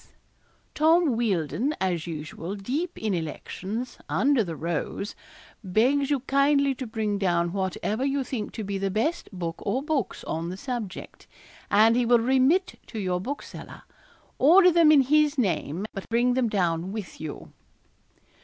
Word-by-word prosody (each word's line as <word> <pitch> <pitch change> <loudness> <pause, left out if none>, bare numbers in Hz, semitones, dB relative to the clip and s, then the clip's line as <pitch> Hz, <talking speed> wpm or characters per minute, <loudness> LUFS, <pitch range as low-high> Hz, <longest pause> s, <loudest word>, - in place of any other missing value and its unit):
Tom 320 -3 +3
Wealdon, 225 - 0
as 175 -3 -1
usual, 165 +3 -6
deep 285 - -3
in 215 -2 -1
elections, 190 +7 -5
under 270 -3 +3
the 170 -4 -5
rose, 170 +5 -3 0.5
begs 255 +9 +2
you 285 -3 +1
kindly 275 +1 +3
to 260 -1 -6
bring 215 -2 -2
down 170 -2 +1
whatever 200 +4 -2
you 275 0 0
think 245 -4 -4
to 220 - -5
be 200 -1 -3
the 195 0 -1
best 230 - -1
book 170 -4 -4
or 245 +7 -2
books 300 -3 -2
on 165 +2 -3
the 185 - -6
subject, 230 -5 -6 0.4
and 220 +3 +5
he 245 -1 +2
will 240 0 +6
remit 265 +10 +2
to 225 - -8
your 180 -3 -1
bookseller. 275 +8 -7 0.6
Order 360 +6 +7
them 330 -2 +6
in 295 -3 +7
his 300 +2 +3
name, 180 - -1
but 195 - -7
bring 240 +2 +2
them 250 -2 +1
down 175 -3 0
with 205 -7 -7
you.' 155 -2 -7
225 Hz, 155 wpm, -26 LUFS, 185-275 Hz, 0.6 s, Order